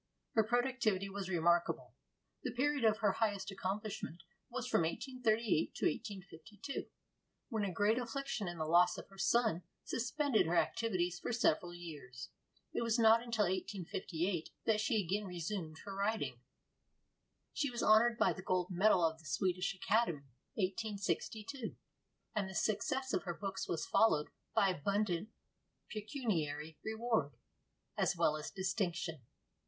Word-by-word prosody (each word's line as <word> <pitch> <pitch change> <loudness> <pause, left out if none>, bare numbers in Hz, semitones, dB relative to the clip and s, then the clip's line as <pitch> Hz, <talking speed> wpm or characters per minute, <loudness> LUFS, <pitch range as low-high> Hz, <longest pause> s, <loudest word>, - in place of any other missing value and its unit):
Her 220 - +5
productivity 230 -4 +1
was 195 -1 -4
remarkable. 170 -1 +2 0.5
The - - -2
period 285 +1 +1
of 220 -1 +5
her 200 - +6
highest 205 -2 -1
accomplishment 195 -3 -4 0.3
was 250 0 -3
from 250 - +3
1838 225 - 0
to - - -1
1852, 200 - -4 0.6
when 220 -4 -1
a 195 - 0
great 205 +6 +2
affliction 245 -3 -3
in 175 -1 -4
the 155 - -1
loss 175 +3 +5
of - - -8
her 195 0 -15
son 215 -2 +3 0.2
suspended 245 - +1
her 170 - +1
activities 180 -4 +1
for - - -3
several 175 -6 +2
years. 150 -8 -8 0.4
It - - 0
was 230 0 +2
not 225 0 +6
until 230 -3 +1
1858 180 -2 -2 0.2
that 215 -1 +3
she 225 0 +2
again 200 +4 -1
resumed 175 -2 -4
her 195 - -5
writing. 195 - -1 1.1
She 285 - 0
was 240 -1 -3
honored 230 +2 +6
by - - +4
the 190 - -8
gold 185 0 0
medal 180 -1 +5
of 160 0 0
the 160 - -17
Swedish 180 +8 0
Academy 175 - +1 0.2
(1862), 215 +4 -2 0.6
and 200 -3 0
the 190 - -8
success 260 +5 0
of - - +2
her 175 -2 -2
books 195 0 -4
was 165 - -1
followed 155 -9 +3 0.3
by 195 - +5
abundant 195 +2 0 0.6
pecuniary 170 - -2
reward 220 -9 0 0.6
as - - +1
well 155 - +3
as 155 -1 -5
distinction. 175 - -2
200 Hz, 140 wpm, -36 LUFS, 175-225 Hz, 1.1 s, her